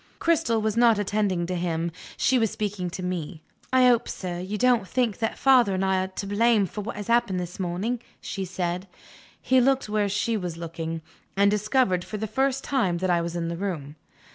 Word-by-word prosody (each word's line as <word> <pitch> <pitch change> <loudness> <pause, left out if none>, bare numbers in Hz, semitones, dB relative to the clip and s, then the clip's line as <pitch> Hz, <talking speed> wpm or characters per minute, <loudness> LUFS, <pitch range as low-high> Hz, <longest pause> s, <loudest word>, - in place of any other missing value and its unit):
Cristel 325 -9 +2
was 215 0 -1
not 235 -2 +5
attending 205 -3 0
to 180 - -3
him, 170 -1 -1 0.3
she 260 -1 +3
was 225 -2 +2
speaking 200 -4 -3
to 180 +2 -6
me. 175 -3 -4 0.3
"I 255 -1 +5
hope, 240 -2 +2
sir, 175 -2 -4
you 190 +4 -4
don't 240 -4 +3
think 245 -3 0
that 225 -1 -1
father 250 -7 +4
and 190 +1 0
I 190 -1 +2
are - - -3
to 190 +1 -6
blame 210 +1 +3
for 210 +3 -6
what 225 +4 -5
has 205 0 -5
happened 230 -6 +2
this 180 +1 -6
morning," 190 +7 -2 0.2
she 195 - -4
said. 180 0 -3 0.5
He 260 -1 +3
looked 265 -2 +2
where 210 -1 +1
she 210 +3 0
was 175 -4 -4
looking 165 -1 -5 0.3
and 200 0 +5
discovered, 210 -3 +1
for 215 - -6
the 220 - -2
first 265 +5 0
time, 215 -11 +1
that 185 +1 0
I 170 -1 +3
was 170 0 -4
in 170 -1 -2
the 170 - -3
room. 165 -7 -4
200 Hz, 210 wpm, -25 LUFS, 180-230 Hz, 0.5 s, not